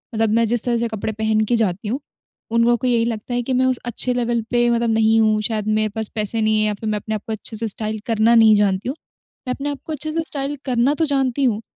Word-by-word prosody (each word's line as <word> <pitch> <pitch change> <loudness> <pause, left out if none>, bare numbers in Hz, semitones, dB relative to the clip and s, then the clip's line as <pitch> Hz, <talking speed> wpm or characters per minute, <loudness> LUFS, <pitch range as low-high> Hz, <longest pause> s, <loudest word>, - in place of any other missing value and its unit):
मतलब 220 0 +1
मैं 230 0 +3
जिस 235 0 +1
तरह 240 -1 +1
से 235 0 0
कपड़े 220 -1 -4
पहन 220 0 0
के 240 - +3
जाती 205 -2 -1
हूँ, 255 +6 -2 0.5
उन 230 0 +3
लोगों 240 0 +3
को 255 - -2
यही 230 -2 +2
लगता 230 +1 -4
है 245 - 0
कि 260 +2 -2
मैं 255 +1 +2
उस 255 -1 +1
अच्छे 245 +1 +1
लेवल 240 -1 0
पे 240 0 +3
मतलब 235 0 +1
नहीं 220 0 +3
हूँ। 215 -1 +2
शायद 215 -1 -2
मेरे 215 0 +1
पास 220 -1 -3
पैसे 220 +1 0
नहीं 215 0 +2
है - - +2
या 210 - 0
फिर 215 +2 -5
मैं 210 - 0
अपने 220 +2 -4
आप 210 - -4
को 220 - -2
अच्छे 220 +1 -3
से 225 +1 -1
स्टाइल 215 +1 -3
करना 230 +1 +3
नहीं 220 -2 +6
जानती 200 +2 +1
हूँ, 270 - -3 0.5
मैं 250 - 0
अपने 285 +2 -4
आप 285 - -6
को 315 - -4
अच्छे 310 +1 -4
से 325 +1 -1
स्टाइल 280 0 -3
करना 255 +1 +2
तो 320 - +1
जानती 275 -2 +1
हूँ 225 -4 +1
230 Hz, 280 wpm, -20 LUFS, 215-245 Hz, 0.5 s, नहीं